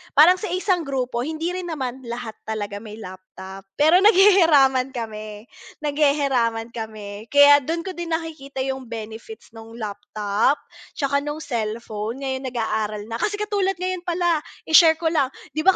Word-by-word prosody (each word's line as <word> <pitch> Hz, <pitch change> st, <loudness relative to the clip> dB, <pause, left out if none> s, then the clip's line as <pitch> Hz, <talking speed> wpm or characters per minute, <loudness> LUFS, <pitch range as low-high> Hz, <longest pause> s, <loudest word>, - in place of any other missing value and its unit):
parang 350 Hz, +6 st, +7 dB
sa 420 Hz, -, -4 dB
isang 365 Hz, -4 st, 0 dB
grupo 255 Hz, -3 st, -2 dB
hindi 320 Hz, +6 st, -2 dB
rin 365 Hz, -1 st, -5 dB
naman 265 Hz, -5 st, -4 dB
lahat 235 Hz, -1 st, -5 dB, 0.2 s
talaga 205 Hz, -2 st, -4 dB
may 215 Hz, -1 st, -10 dB
laptop, 190 Hz, -1 st, -11 dB
pero 315 Hz, +5 st, +5 dB
naghihiraman 325 Hz, -, +5 dB
kami, 215 Hz, -2 st, -6 dB, 0.4 s
naghihiraman 275 Hz, -6 st, +1 dB
kami, 215 Hz, -1 st, -7 dB
kaya 285 Hz, +1 st, +7 dB
dun 330 Hz, +5 st, -3 dB
ko 380 Hz, -, -5 dB
din 340 Hz, -2 st, -3 dB
nakikita 280 Hz, -5 st, -5 dB
yung 265 Hz, -2 st, -4 dB
benefits 225 Hz, -, -9 dB
nung 225 Hz, 0 st, -12 dB
laptop, 210 Hz, +3 st, -1 dB, 0.4 s
'tsaka 280 Hz, -1 st, 0 dB
nung 295 Hz, +2 st, -5 dB
cellphone, 225 Hz, +1 st, -4 dB
ngayon 265 Hz, 0 st, -3 dB
nag-aaral 215 Hz, -3 st, -2 dB
na 230 Hz, -, -3 dB
kasi 415 Hz, 0 st, 0 dB
katulad 405 Hz, -2 st, -1 dB
ngayon 365 Hz, 0 st, -3 dB
pala 345 Hz, -2 st, +1 dB, 0.2 s
i-share 320 Hz, 0 st, +6 dB
ko 320 Hz, 0 st, -1 dB
lang 285 Hz, -5 st, +2 dB, 0.2 s
'di 310 Hz, -, -4 dB
ba 380 Hz, -, +7 dB
270 Hz, 150 wpm, -22 LUFS, 220-325 Hz, 0.4 s, parang